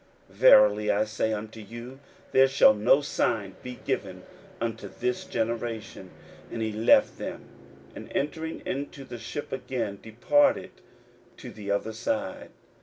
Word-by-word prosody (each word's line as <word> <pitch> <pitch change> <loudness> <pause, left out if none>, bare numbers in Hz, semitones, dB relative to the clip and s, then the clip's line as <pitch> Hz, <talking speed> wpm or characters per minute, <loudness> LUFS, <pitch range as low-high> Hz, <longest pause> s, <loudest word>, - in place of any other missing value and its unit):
verily 105 0 +6
I 105 +1 +2
say 110 +1 -1
unto 110 +1 -5
you, 120 +5 -9 0.3
There 135 0 +6
shall 135 -5 +6
no 110 +7 +4
sign 110 -8 -1
be 125 0 -7
given - - -3 0.4
unto 115 -2 -3
this 125 +5 -3
generation. 115 -4 -4 0.4
41:008:013 - - -13
And 115 - -3
he 110 - -1
left 110 +2 +4
them, - - -6 0.5
and - - -9
entering 160 +3 -3
into 140 0 -4
the 120 -2 -8
ship 145 - -6
again 120 -6 -3
departed 275 - +2 0.7
to - - -9
the 105 -2 -8
other 100 +2 -1
side. 285 - -3
115 Hz, 140 wpm, -27 LUFS, 105-135 Hz, 0.7 s, verily